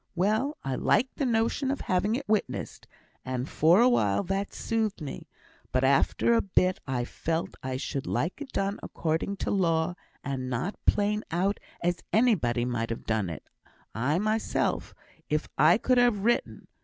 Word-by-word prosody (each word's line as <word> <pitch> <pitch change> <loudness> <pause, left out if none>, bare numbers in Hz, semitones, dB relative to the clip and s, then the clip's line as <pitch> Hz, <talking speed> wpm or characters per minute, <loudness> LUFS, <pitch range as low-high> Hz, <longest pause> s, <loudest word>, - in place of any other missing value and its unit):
Well! 215 - +1
I 135 - -2
liked 255 - +1
the 275 - 0
notion 235 +4 +1
of 275 - -1
having 195 +4 +1
it 270 +2 -5
witnessed, 215 -1 -2 0.4
and 130 0 -3
for 165 +5 +4
a 245 - +6
while 105 - +2
that 195 +2 -2
soothed 220 -2 -1
me; 150 -4 -7 0.4
but 130 0 +1
after 140 - +3
a 230 - +4
bit, 185 -1 +1
I 125 -2 -1
felt 165 +5 -3
I 130 0 -3
should 135 +1 -4
like 175 - -1
it 280 - -7
done 195 +1 -1
according 165 +5 -2
to - - -1
law, 170 -3 +1 0.3
and 130 -2 -3
not 135 - -2
plain 210 +1 +2
out 185 +4 0 0.2
as 175 0 +1
anybody 175 - +2
might 115 -2 -2
ha' 115 - -5
done 110 -5 0
it; 80 - -8 0.5
I 135 +8 0
mysel', 215 +3 0 0.5
if - - 0
I - - +6
could 255 -1 +2
have 240 -5 +3
written. 240 +2 0
185 Hz, 165 wpm, -28 LUFS, 135-220 Hz, 0.5 s, a